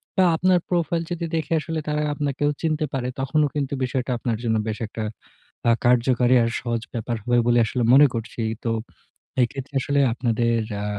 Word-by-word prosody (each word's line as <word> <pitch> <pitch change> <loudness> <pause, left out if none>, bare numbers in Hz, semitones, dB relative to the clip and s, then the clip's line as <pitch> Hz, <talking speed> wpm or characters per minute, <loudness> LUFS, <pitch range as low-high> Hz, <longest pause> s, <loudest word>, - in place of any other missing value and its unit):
বা 190 - +4
আপনার 180 +1 +3
প্রোফাইল 170 -1 0
যদি 170 -1 -2
দেখে 160 0 -1
আসলে 160 +1 -3
তারা 150 0 0
আপনাকেও 145 0 -1
চিনতে 155 -1 0
পারে 125 -2 -2
তখনও 150 +3 +2
কিন্তু 140 -2 -1
বিষয়টা 130 0 -2
আপনার 115 -2 -2
জন্য 110 -1 +1
বেশ 110 -1 -2
একটা 110 - -5 0.7
আ - - +6
কার্যকারী 125 +1 +4
আর 115 - +1
সহজ 115 -2 -2
ব্যাপার 115 0 -2
হবে 120 0 +2
বলে 120 0 +4
আসলে 120 +2 -1
মনে 145 +2 +8
করছি। 115 0 -5 0.2
তো 115 - +1 0.7
এক্ষেত্রে 135 +3 -4
আসলে 140 +1 0
আপনাদের 115 -1 +1 0.2
আ - - -3
130 Hz, 175 wpm, -23 LUFS, 120-150 Hz, 0.7 s, মনে